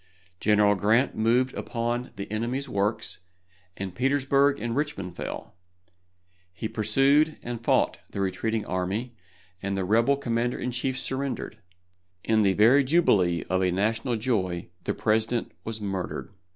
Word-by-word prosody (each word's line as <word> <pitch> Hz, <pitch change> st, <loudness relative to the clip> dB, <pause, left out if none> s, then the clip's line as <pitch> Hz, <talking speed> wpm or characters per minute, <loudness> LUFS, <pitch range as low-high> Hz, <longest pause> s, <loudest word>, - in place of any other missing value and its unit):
General 105 Hz, -1 st, +4 dB
Grant 110 Hz, +7 st, +2 dB
moved 120 Hz, +4 st, +2 dB
upon 120 Hz, +1 st, -2 dB
the 100 Hz, -, -5 dB
enemy's 120 Hz, +6 st, -2 dB
works, 105 Hz, +2 st, -1 dB, 0.6 s
and 95 Hz, -2 st, -5 dB
Petersburg 140 Hz, +3 st, +2 dB
and 120 Hz, 0 st, -2 dB
Richmond 100 Hz, -, -3 dB
fell. -, -, -6 dB, 1.0 s
He 105 Hz, +4 st, -4 dB
pursued 135 Hz, +8 st, +3 dB
and 120 Hz, -1 st, -5 dB
fought -, -, +2 dB
the -, -, -5 dB
retreating 105 Hz, +3 st, -1 dB
army, 100 Hz, +7 st, -2 dB, 0.5 s
and 100 Hz, 0 st, -2 dB
the 95 Hz, -, -1 dB
rebel 115 Hz, +8 st, +3 dB
commander 120 Hz, -2 st, -1 dB
in 125 Hz, -, -3 dB
chief 130 Hz, +1 st, -2 dB
surrendered. 130 Hz, -4 st, -3 dB, 0.6 s
In 110 Hz, -1 st, +3 dB
the 100 Hz, -2 st, +3 dB
very 120 Hz, +8 st, +5 dB
jubilee 100 Hz, -, +3 dB
of 95 Hz, +1 st, 0 dB
a 95 Hz, -, +2 dB
national 110 Hz, +6 st, 0 dB
joy 95 Hz, -8 st, -1 dB, 0.2 s
the -, -, -1 dB
President 110 Hz, +2 st, 0 dB
was 110 Hz, 0 st, -5 dB
murdered. 95 Hz, -2 st, -4 dB
110 Hz, 140 wpm, -26 LUFS, 100-125 Hz, 1.0 s, very